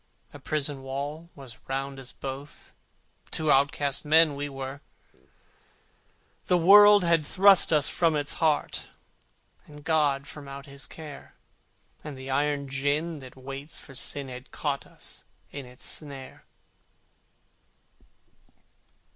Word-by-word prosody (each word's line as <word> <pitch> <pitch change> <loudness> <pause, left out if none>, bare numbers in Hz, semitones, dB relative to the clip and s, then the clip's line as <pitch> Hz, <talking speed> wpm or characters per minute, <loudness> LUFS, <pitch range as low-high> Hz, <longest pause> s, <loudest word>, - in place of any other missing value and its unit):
A - - -10
prison 145 -2 -3
wall 145 +5 -5
was 135 -4 -11
round 135 +1 -3
us 125 -2 -7
both, 135 +3 -8 0.6
Two 155 -2 0
outcast 140 0 +2
men 155 0 +5
we 145 +1 -4
were: 135 +1 -6 1.7
The 180 - +4
world 205 +3 +8
had 170 -2 +3
thrust 195 +4 +5
us 150 -3 +5
from 165 -3 +2
its 145 -1 -1
heart, 155 -2 +1 0.8
And 150 -1 -13
God 145 -4 +2
from 145 -1 -10
out 140 0 -8
His 140 -1 -9
care: 150 -3 -11 0.7
And 150 -3 -7
the 130 +1 -7
iron 145 +1 0
gin 145 +4 -1
that 130 -2 -12
waits 135 +3 -7
for 135 - -12
Sin 140 +1 -1
Had 125 0 -9
caught 140 -2 -3
us - - -7 0.3
in 140 -3 -7
its 125 0 -8
snare. 140 -3 -5
145 Hz, 125 wpm, -27 LUFS, 135-155 Hz, 1.7 s, world